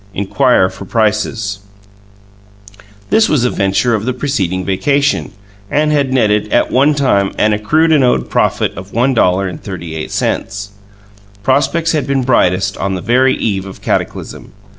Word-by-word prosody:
iNQuiRE 100 0 +2
FOR 100 - -10
PRicEs 110 -1 -1 1.5
This 220 0 +4
was 135 -5 +2
a 125 - +1
venture 100 +4 +1
of 105 -2 -1
the 130 - -1
preceding 95 -10 -2
vacation, 140 +9 0 0.4
and 150 +1 +1
had 140 -3 +1
netted, 105 -4 +1
at - - +2
one 140 +4 +3
time, 100 -9 +1
an 105 0 +2
accrued 155 +11 +1
and 150 -4 +4
owed 125 - +1
profit - - 0
of 95 +1 -10
$1.38. 95 - -1 0.7
Prospects 160 +6 +1
had 155 -3 -1
been 135 -1 0
brightest 95 -6 +1
on 95 -1 -2
the 90 - -5
very 130 +4 +2
eve 100 -3 -2
of 95 - -11
cataclysm. - - -3
110 Hz, 140 wpm, -15 LUFS, 100-135 Hz, 1.5 s, This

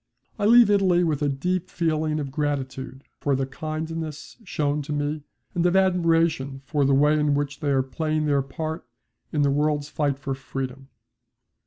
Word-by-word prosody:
I 205 - +2
leave 235 -1 +7
Italy 185 -3 +4
with 155 -4 0
a 145 - +2
deep 180 +6 -1
feeling 155 -3 0
of 140 -2 -4
gratitude 135 -2 -3 0.2
for 140 -1 +1
the 135 0 0
kindness 155 +2 -5
shown 150 -6 -1
to 150 +1 -7
me, 145 +1 -1 0.3
and 175 -2 0
of 180 +1 +3
admiration 165 -7 +2
for 145 -1 +1
the 135 0 +4
way 150 +2 +4
in 150 -1 +2
which 145 0 -2
they 150 -3 -1
are 135 -2 +3
playing 155 +3 -1
their 140 -2 +2
part 155 +3 -5 0.4
in 150 -2 +1
the 140 - +3
world's 145 0 0
fight 145 -3 0
for 135 -1 -3
freedom. 135 0 -6
150 Hz, 175 wpm, -25 LUFS, 140-160 Hz, 0.4 s, leave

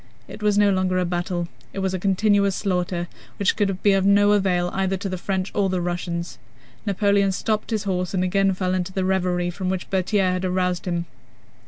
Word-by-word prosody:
It - - -10
was 210 -1 +2
no 205 -1 +5
longer 185 -1 +1
a 180 - +1
battle: 175 0 -2 0.3
it - - -9
was 190 -1 -1
a 185 - -2
continuous 200 +1 +2
slaughter 180 -3 -1 0.3
which 200 - +2
could 195 -3 -1
be 205 - +5
of 195 -1 +2
no 205 +1 +5
avail 180 -3 +2
either 190 0 0
to 195 +2 -4
the 185 - -3
French 190 0 -2
or 200 -2 +1
the 185 -1 0
Russians. 175 -1 -3 0.5
Napoleon 200 0 +2
stopped 215 +3 -1
his 220 -3 -1
horse 180 -3 -1
and 185 - +1
again 195 +1 +2
fell 185 0 -1
into 185 0 -1
the 190 0 -1
reverie 180 -2 0
from 185 +1 -3
which 185 -1 -3
Berthier 190 0 +1
had 180 0 -2
aroused 180 -1 0
him. 170 -1 -1
185 Hz, 205 wpm, -23 LUFS, 180-200 Hz, 0.5 s, no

